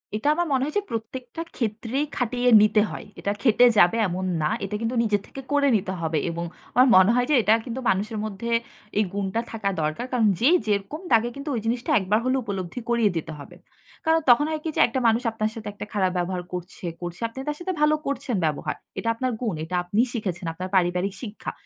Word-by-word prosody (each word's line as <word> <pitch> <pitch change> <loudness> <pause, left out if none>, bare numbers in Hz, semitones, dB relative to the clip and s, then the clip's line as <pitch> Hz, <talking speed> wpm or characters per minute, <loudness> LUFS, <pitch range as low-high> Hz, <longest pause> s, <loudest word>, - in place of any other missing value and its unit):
এটা 215 +6 -2
আমার 345 +1 0
মনে 260 - +2
হয় 300 - -5
যে 410 - +1
প্রত্যেকটা 245 +6 -5 0.2
ক্ষেত্রেই 235 +5 -1
খাটিয়ে 245 0 +1
নিতে 215 0 +4
হয়। - - -7
এটা 200 - -1
খেটে 245 -1 +5
যাবে 180 +3 +5
এমন 185 +1 -3 0.2
না। 150 - +1 0.2
এটা 195 - -4
কিন্তু 230 +2 -1
নিজের 205 -2 +1
থেকে 270 - -8
করে 285 -1 +3
নিতে 190 -1 -4
হবে 160 -1 0
এবং 170 +1 -3 0.3
আমার 250 +2 +7
মনে 190 +3 +7
হয় 245 0 +2
যে - - +5
এটা 215 0 +4
কিন্তু 245 0 -4
মানুষের 210 +3 0
মধ্যে 215 +2 -5 0.5
এই 210 - +4
গুণটা 200 +2 -1
থাকা 215 -3 -1
দরকার। 155 +10 -2
কারণ 240 -4 +3
যেই 285 +9 +5
যেরকম 205 - -1
তাকে 230 +1 +4
কিন্তু 280 +2 -6
ওই - - 0
জিনিসটা 240 +2 -1
একবার 195 +3 +1
হলে 255 +1 +2
উপলব্ধি 195 +2 -4
করিয়ে 235 -3 +3
দিতে 160 0 -4
হবে। 145 - -11 0.5
কারণ 320 0 +4
তখন 245 +5 +6
হয় 310 -1 -3
কি 325 - -2
যে - - +3
একটা 250 +2 -2
মানুষ 225 +1 +3
আপনার 215 -1 -1
সাথে 220 -2 -7
একটা 210 - -7
খারাপ 190 -3 +1
ব্যবহার 180 +1 -1
করছে, 180 +1 -7 0.2
করছে। 175 0 -6
আপনি 230 - -17
তার 295 0 -2
সাথে 370 +2 -3
ভালো 300 0 +5
করছেন 275 -3 -2
ব্যবহার। 150 -2 -2 0.2
এটা 230 - -1
আপনার 255 +2 -1
গুণ। 220 -8 -1
এটা 180 +3 -4
আপনি 200 +5 +1
শিখেছেন, 185 -6 -3
আপনার 185 +3 -6
পারিবারিক 180 +1 +1
শিক্ষা। 220 -4 -6
220 Hz, 215 wpm, -24 LUFS, 190-250 Hz, 0.5 s, আমার